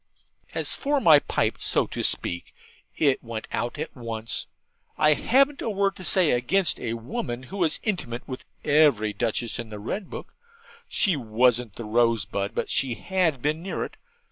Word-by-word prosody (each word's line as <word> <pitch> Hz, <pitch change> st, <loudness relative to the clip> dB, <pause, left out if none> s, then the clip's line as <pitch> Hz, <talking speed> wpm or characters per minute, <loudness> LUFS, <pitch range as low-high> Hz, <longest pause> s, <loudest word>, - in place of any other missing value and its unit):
As -, -, -2 dB
for 290 Hz, 0 st, 0 dB
my 160 Hz, -, +7 dB
pipe, -, -, 0 dB
so -, -, +2 dB
to -, -, -5 dB
speak, 85 Hz, 0 st, 0 dB, 0.4 s
it 140 Hz, -3 st, +2 dB
went 115 Hz, -2 st, -6 dB
out 120 Hz, +5 st, -2 dB
at 155 Hz, -, -5 dB
once. 115 Hz, -3 st, -4 dB, 0.5 s
I 150 Hz, 0 st, +5 dB
hadn't 275 Hz, -, +2 dB
a -, -, -2 dB
word 200 Hz, -1 st, +1 dB
to 185 Hz, -, -9 dB
say 180 Hz, -2 st, +4 dB
against 165 Hz, +10 st, +2 dB
a 115 Hz, -2 st, -3 dB
woman 120 Hz, +1 st, -4 dB
who 190 Hz, +10 st, -8 dB
was 170 Hz, -5 st, +1 dB
intimate 150 Hz, -, -3 dB
with 130 Hz, -, -6 dB, 0.2 s
every 140 Hz, -9 st, +4 dB
Duchess 120 Hz, 0 st, -1 dB
in 115 Hz, -2 st, -5 dB
the 105 Hz, -, -7 dB
Red 175 Hz, -, -4 dB
Book. -, -, -8 dB, 0.6 s
She 195 Hz, -6 st, +2 dB
wasn't 120 Hz, -2 st, +1 dB
the 115 Hz, -, -7 dB
rosebud, 110 Hz, -3 st, +1 dB
but -, -, -2 dB
she 130 Hz, -3 st, +1 dB
had 170 Hz, -8 st, 0 dB
been 155 Hz, +2 st, 0 dB
near 190 Hz, -, -3 dB
it. -, -, -11 dB
130 Hz, 170 wpm, -25 LUFS, 115-180 Hz, 0.6 s, my